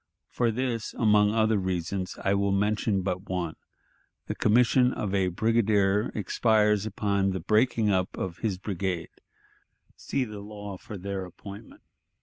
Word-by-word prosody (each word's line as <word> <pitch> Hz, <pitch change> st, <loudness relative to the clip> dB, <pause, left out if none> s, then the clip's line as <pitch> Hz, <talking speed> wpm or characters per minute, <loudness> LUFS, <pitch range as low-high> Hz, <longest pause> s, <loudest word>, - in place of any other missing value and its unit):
For 120 Hz, -1 st, +1 dB
this, 115 Hz, -1 st, -2 dB
among 105 Hz, -2 st, +4 dB
other 110 Hz, -1 st, +2 dB
reasons, 95 Hz, 0 st, -3 dB
I 95 Hz, -, +2 dB
will 100 Hz, 0 st, +1 dB
mention 105 Hz, 0 st, +1 dB
but 95 Hz, +1 st, -3 dB
one: 90 Hz, -3 st, -2 dB, 0.7 s
the -, -, -3 dB
commission 125 Hz, +3 st, +4 dB
of 100 Hz, -2 st, -3 dB
a 95 Hz, -2 st, +2 dB
brigadier 105 Hz, +1 st, +2 dB
expires 105 Hz, 0 st, +2 dB
upon 100 Hz, -2 st, 0 dB
the 95 Hz, -, -2 dB
breaking 110 Hz, +3 st, +2 dB
up 95 Hz, -1 st, 0 dB
of 90 Hz, -3 st, -4 dB
his 105 Hz, -5 st, -1 dB
brigade 95 Hz, -3 st, -3 dB, 0.9 s
(see 135 Hz, -, -2 dB
the 105 Hz, -3 st, -8 dB
law 105 Hz, -1 st, -8 dB
for 105 Hz, -, -8 dB
their 95 Hz, +1 st, -4 dB
appointment). 100 Hz, +3 st, -11 dB
100 Hz, 140 wpm, -27 LUFS, 95-110 Hz, 0.9 s, among